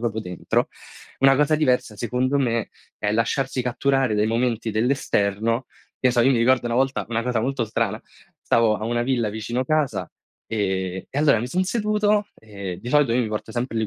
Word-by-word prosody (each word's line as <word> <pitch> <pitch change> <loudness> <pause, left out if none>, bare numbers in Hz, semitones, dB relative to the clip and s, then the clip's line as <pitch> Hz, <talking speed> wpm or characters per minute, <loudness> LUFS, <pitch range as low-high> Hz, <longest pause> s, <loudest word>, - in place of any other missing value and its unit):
proprio 115 -2 -2
dentro." 90 -3 -1 0.5
Una 135 0 +6
cosa 150 +2 +3
diversa, 125 -7 +1
secondo 125 +5 0
me, 115 -4 0 0.3
è 105 0 -1
lasciarsi 125 +3 0
catturare 130 -1 +1
dai 105 +1 +2
momenti 115 -1 0
dell'esterno. 115 -1 0 0.3
Che 125 - +4
so, 120 -1 +2
io 130 - +4
mi 120 - +2
ricordo 125 +1 +3
una 120 - -1
volta 135 +1 0
una 115 0 -1
cosa 125 -2 0
molto 130 0 -1
strana, 110 - -2 0.4
stavo 115 -2 +3
a 110 - -5
una 120 +1 0
villa 120 -3 0
vicino 110 +4 -3
casa, 130 - 0 0.4
ehm, 95 -3 -2
e 140 - -3
allora 145 -6 +4
mi 120 - -3
son 180 +8 0
seduto, 210 0 +1
ehm, 100 -4 -7
di 120 - -7
solito 145 -5 +4
io 125 - +2
mi 115 - -2
porto 105 +1 -4
sempre 120 0 -2
le 110 - 0
120 Hz, 190 wpm, -23 LUFS, 110-135 Hz, 0.5 s, Una